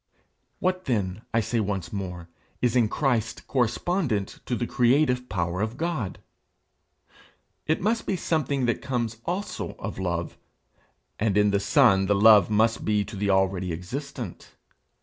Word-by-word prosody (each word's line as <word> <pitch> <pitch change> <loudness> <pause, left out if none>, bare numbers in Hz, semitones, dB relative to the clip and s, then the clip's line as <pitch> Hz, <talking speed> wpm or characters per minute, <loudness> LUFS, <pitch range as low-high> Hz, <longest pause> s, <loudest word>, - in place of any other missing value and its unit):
What 185 0 -1
then, 105 -6 -1
I 115 - +2
say 115 +1 -1
once 100 -4 -3
more, 90 -4 -5 0.3
is 125 0 +1
in 115 -4 +3
Christ 120 -6 -1
correspondent 125 - -1
to 125 - 0
the 120 - -2
creative 125 +1 +2
power 90 -1 -1
of 110 +3 -2
God? 155 - -2 1.5
It 155 - +1
must 220 +4 0
be 195 - +1
something 145 -6 0
that 120 - 0
comes 120 -4 -2
also 190 +4 -3
of - - -7
love; 85 -2 -3 0.8
and 105 -2 +1
in 105 0 +4
the 100 - +2
Son 95 -1 +4
the 100 - +3
love 105 -2 +7
must 110 +2 +2
be 105 -1 +1
to 110 - -9
the 100 +1 -1
already 95 -2 +1
existent. 120 - -6
110 Hz, 150 wpm, -26 LUFS, 100-130 Hz, 1.5 s, love